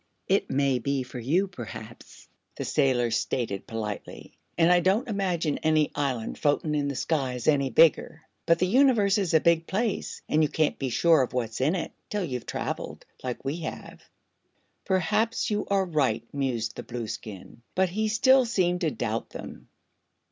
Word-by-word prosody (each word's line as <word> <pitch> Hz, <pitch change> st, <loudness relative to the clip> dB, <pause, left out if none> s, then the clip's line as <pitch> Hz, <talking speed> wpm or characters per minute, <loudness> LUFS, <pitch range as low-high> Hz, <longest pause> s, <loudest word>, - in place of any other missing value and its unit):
"It -, -, +1 dB
may 135 Hz, -1 st, +1 dB
be 140 Hz, +2 st, -1 dB
for 125 Hz, 0 st, -8 dB
you, 165 Hz, +12 st, +1 dB
perhaps," 115 Hz, -, -10 dB, 0.3 s
the -, -, -4 dB
sailor 125 Hz, -5 st, +2 dB
stated, 110 Hz, -3 st, -2 dB
politely, 105 Hz, -2 st, -6 dB, 0.2 s
"an' 165 Hz, +1 st, +5 dB
I 180 Hz, -, +6 dB
don't 195 Hz, +9 st, +1 dB
imagine 180 Hz, -8 st, -1 dB
any 155 Hz, -1 st, +2 dB
island 130 Hz, -6 st, -2 dB
floatin' 150 Hz, +1 st, +1 dB
in 145 Hz, -1 st, 0 dB
the 140 Hz, -, -3 dB
sky 135 Hz, -2 st, -1 dB
is 125 Hz, -, -6 dB
any 140 Hz, -3 st, +3 dB
bigger. 160 Hz, +1 st, +3 dB, 0.2 s
But 170 Hz, -, +5 dB
the 185 Hz, -, +1 dB
Universe 215 Hz, -3 st, +4 dB
is 180 Hz, -5 st, 0 dB
a -, -, +7 dB
big 165 Hz, 0 st, +2 dB
place 215 Hz, +2 st, -2 dB
an' 155 Hz, -, +2 dB
you 155 Hz, -, +2 dB
can't 155 Hz, 0 st, 0 dB
be 135 Hz, -, -1 dB
sure 160 Hz, +4 st, +4 dB
of 130 Hz, -, -2 dB
what's 120 Hz, -2 st, -2 dB
in 150 Hz, +7 st, +2 dB
it 175 Hz, -, -3 dB, 0.2 s
till 210 Hz, -2 st, -2 dB
you've 125 Hz, -6 st, -5 dB
traveled, -, -, -5 dB, 0.2 s
like 125 Hz, -2 st, -5 dB
we 140 Hz, +4 st, -2 dB
have." 165 Hz, -2 st, -7 dB, 0.8 s
"Perhaps 210 Hz, +6 st, +1 dB
you 210 Hz, 0 st, -1 dB
are 195 Hz, -1 st, +2 dB
right," 140 Hz, -10 st, 0 dB
mused 120 Hz, -6 st, -2 dB
the -, -, -4 dB
Blueskin; 110 Hz, -2 st, -7 dB
but 190 Hz, 0 st, +2 dB
he 215 Hz, +4 st, -1 dB
still 260 Hz, +5 st, +5 dB
seemed 180 Hz, -6 st, 0 dB
to 165 Hz, -, +2 dB
doubt 115 Hz, -5 st, -3 dB
them. -, -, -9 dB
155 Hz, 175 wpm, -27 LUFS, 125-185 Hz, 0.8 s, a